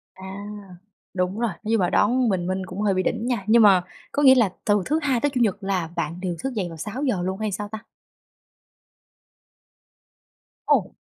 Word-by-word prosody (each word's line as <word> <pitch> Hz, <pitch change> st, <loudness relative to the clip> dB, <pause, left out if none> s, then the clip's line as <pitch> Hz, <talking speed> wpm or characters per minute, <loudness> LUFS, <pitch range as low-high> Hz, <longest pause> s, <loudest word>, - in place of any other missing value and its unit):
À, 190 Hz, -, -11 dB, 0.9 s
đúng 180 Hz, +2 st, -1 dB
rồi, 235 Hz, -1 st, 0 dB
nhưng 225 Hz, 0 st, +1 dB
mà 180 Hz, -, +1 dB
đón 240 Hz, +3 st, +3 dB
bình 180 Hz, -3 st, 0 dB
minh 185 Hz, 0 st, -2 dB
cũng 185 Hz, +2 st, -7 dB
hơi 205 Hz, -2 st, +2 dB
bị 185 Hz, -, +1 dB
đỉnh 225 Hz, -, -2 dB
nha, 240 Hz, -6 st, -1 dB
nhưng 230 Hz, +1 st, +6 dB
mà 195 Hz, -4 st, +6 dB, 0.3 s
có 290 Hz, -, 0 dB
nghĩa 265 Hz, -2 st, +8 dB
là 225 Hz, -8 st, +3 dB
từ 205 Hz, -2 st, +2 dB
thứ 310 Hz, -, +1 dB
Hai 265 Hz, -5 st, +1 dB
tới 290 Hz, -, +1 dB
Chủ 250 Hz, -, 0 dB
nhật 210 Hz, -3 st, +1 dB
là 185 Hz, -4 st, -1 dB
bạn 165 Hz, +4 st, -3 dB
đều 180 Hz, -2 st, -2 dB
thức 270 Hz, -1 st, -3 dB
dậy 195 Hz, -5 st, -2 dB
vào 165 Hz, -, -9 dB
6:00 210 Hz, -, -2 dB
luôn 190 Hz, +1 st, -2 dB
hay 215 Hz, -1 st, -2 dB
sao 205 Hz, +2 st, -4 dB
ta? 220 Hz, +1 st, -6 dB, 2.9 s
Ồ! -, -, +2 dB
205 Hz, 195 wpm, -23 LUFS, 185-235 Hz, 2.9 s, nghĩa